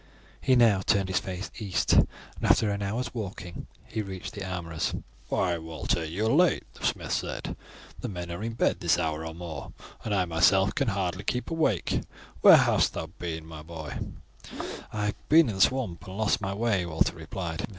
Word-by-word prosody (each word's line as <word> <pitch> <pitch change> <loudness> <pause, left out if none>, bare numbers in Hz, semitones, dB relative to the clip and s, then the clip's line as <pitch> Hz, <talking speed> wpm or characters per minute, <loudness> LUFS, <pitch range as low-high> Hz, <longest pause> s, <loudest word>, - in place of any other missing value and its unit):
He 130 - +4
now 115 -6 +5
turned 100 -2 +2
his 95 - +2
face 95 +1 -5
east, 100 -4 +1
and - - +6 0.3
after 105 -2 +4
an 100 0 -2
hour's 110 +6 -2
walking 95 -6 -6 0.2
he 110 - -3
reached 95 -3 -6
the - - -5
armourer's. 85 -4 -2 0.3
"Why, 90 -3 +1
Walter, 80 +1 -2
you 85 +7 -2
are - - +3
late," 170 +7 +4
the - - -14
smith - - -1
said. - - -3 0.4
"The - - -4
men 90 -3 -5
are 85 - -5
in 115 0 -2
bed 115 - +1
this 85 -1 +3
hour 80 -2 -1
or 80 0 -6
more, 85 -4 -7 0.3
and 110 - -3
I 95 -2 +2
myself 95 +4 +4
can 140 - 0
scarce 95 -3 -1
keep 125 +6 -1
awake. 155 - +1 0.4
Where - - +10
hast - - +3
thou 80 0 -4
been, 80 -2 -4
my 80 -1 -9
boy?" 80 -2 -7 0.9
"I 105 -1 -1
have 105 - -4
been 160 -3 +7
in - - -2
the - - -1
swamps 100 -8 +2
and 95 +1 -7
lost 110 -1 +2
my 95 0 -2
way," 105 -4 +1
Walter 80 +1 +1
replied. 80 0 -4
95 Hz, 190 wpm, -28 LUFS, 85-105 Hz, 0.9 s, Where